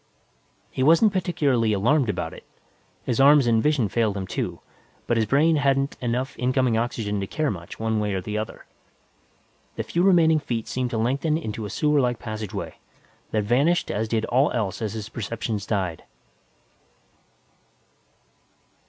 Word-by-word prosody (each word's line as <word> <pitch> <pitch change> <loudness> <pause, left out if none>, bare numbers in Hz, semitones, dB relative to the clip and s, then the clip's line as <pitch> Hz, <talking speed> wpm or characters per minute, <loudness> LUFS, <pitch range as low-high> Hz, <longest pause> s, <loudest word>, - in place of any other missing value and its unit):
He - - -4
wasn't 165 +9 +5
particularly 145 - +1
alarmed 120 +6 +2
about - - -3
it; - - -12 0.6
his 125 - -1
arms 140 0 +6
and 115 -2 +3
vision 150 -6 +2
failed 105 0 0
him 95 - -3
too, 95 - -4 0.5
but 120 - +1
his 110 -2 +1
brain 155 +6 +3
hadn't 140 -1 +1
enough 125 +2 -2
incoming 130 -1 +1
oxygen 110 -3 -1
to 95 - -3
care 155 +3 -1
much, 85 -3 -8
one 110 -1 0
way 105 -2 -1
or 95 - -2
the 105 +3 -5
other. 110 +1 -5 1.1
The - - -3
few 170 - -1
remaining 170 -4 +5
feet 120 -6 -4
seemed 125 -1 -2
to 120 - -3
lengthen 140 +7 0
into 110 -8 -5
a - - -9
sewerlike 135 -1 +1
passageway, 110 -3 -6 0.5
then 105 -1 0
vanished 140 +11 +2
as 110 +2 -1
did 110 0 0
all 130 +4 +2
else 105 -5 -2
as 110 -2 -2
his 110 -2 -5
perceptions 110 -2 -4
died. 95 -6 -2
120 Hz, 155 wpm, -24 LUFS, 110-140 Hz, 1.1 s, arms